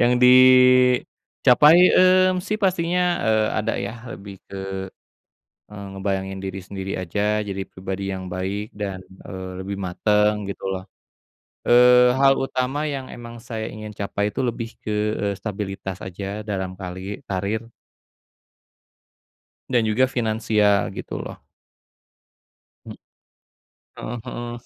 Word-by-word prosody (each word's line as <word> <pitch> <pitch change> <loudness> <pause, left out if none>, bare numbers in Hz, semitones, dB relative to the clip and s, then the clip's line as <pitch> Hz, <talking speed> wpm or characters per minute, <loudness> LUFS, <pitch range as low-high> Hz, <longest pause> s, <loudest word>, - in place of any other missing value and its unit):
yang 120 +1 +4
dicapai, 125 +3 +5 0.2
mmm, 185 0 +4
sih 215 - -2
pastinya, 180 -2 +1 0.2
eee, 110 -1 +2
ada 110 +1 -1
ya. - - -4 0.2
Lebih 100 0 -9
ke, 100 - -8 1.2
eee, 100 -1 -8
ngebayangin 95 0 -3
diri 95 0 -5
sendiri 95 +1 -6
aja, 105 +4 -1
jadi 100 -1 -4
pribadi 95 +1 -6
yang 95 -1 -5
baik 95 +4 -4
dan, 100 -2 -4 0.3
eee, 95 +1 -7
lebih 100 0 -5
mateng, 105 +3 +1
gitu - - -7
loh. 95 -1 -3 0.8
Eee, 125 +1 +6
hal 135 0 +5
utama 135 +3 -2
yang 135 -3 -5
emang 120 -1 -10
saya 110 -2 -5
ingin 105 0 -8
capai 100 0 -2
itu - - -6
lebih 115 -1 -3
ke, 105 - -4 0.3
eee, 100 -1 -1
stabilitas 95 -2 -5
aja 100 +3 -6
dalam 95 -2 -4
kali 95 +2 -6
karir. 100 +4 -2 2.0
Dan 125 -2 +3
juga 130 +5 +3
finansial 110 -5 +1
gitu - - -6
loh. - - -7 1.5
Hmm. - - -9 1.0
Heeh 120 - -6
heeh. 120 0 -5
105 Hz, 120 wpm, -22 LUFS, 95-125 Hz, 2.0 s, Eee